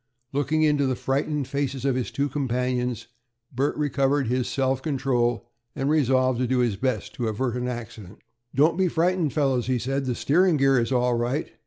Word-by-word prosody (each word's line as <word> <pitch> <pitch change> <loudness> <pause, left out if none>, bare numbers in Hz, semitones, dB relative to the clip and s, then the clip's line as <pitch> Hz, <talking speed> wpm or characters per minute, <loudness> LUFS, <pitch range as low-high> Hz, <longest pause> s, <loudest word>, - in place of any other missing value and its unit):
Looking 145 +3 +1
into 145 -2 +3
the 130 - 0
frightened 140 +2 -1
faces 140 -2 -2
of 135 - +2
his 125 -1 -2
two 140 +1 -1
companions, 125 -3 -2 0.5
Bert 135 +4 0
recovered 140 -1 +1
his 125 +1 0
self 130 -1 0
control, 125 -5 0 0.3
and 135 +2 0
resolved 130 -4 +2
to 125 - 0
do 130 +1 +1
his 120 -4 +1
best 110 -2 -2
to 120 - -3
avert 120 +3 -1
an 125 0 -2
accident. 110 -5 -7 0.4
"Don't 155 +6 +3
be 190 - +3
frightened, 170 -2 +1
fellows," 135 -5 0
he 130 -1 +1
said. 135 +3 -2
"The 125 -2 -1
steering 175 +5 +3
gear 135 -2 +4
is 115 +2 -1
all 125 -1 +2
right. 120 +6 -1
130 Hz, 185 wpm, -25 LUFS, 125-145 Hz, 0.5 s, gear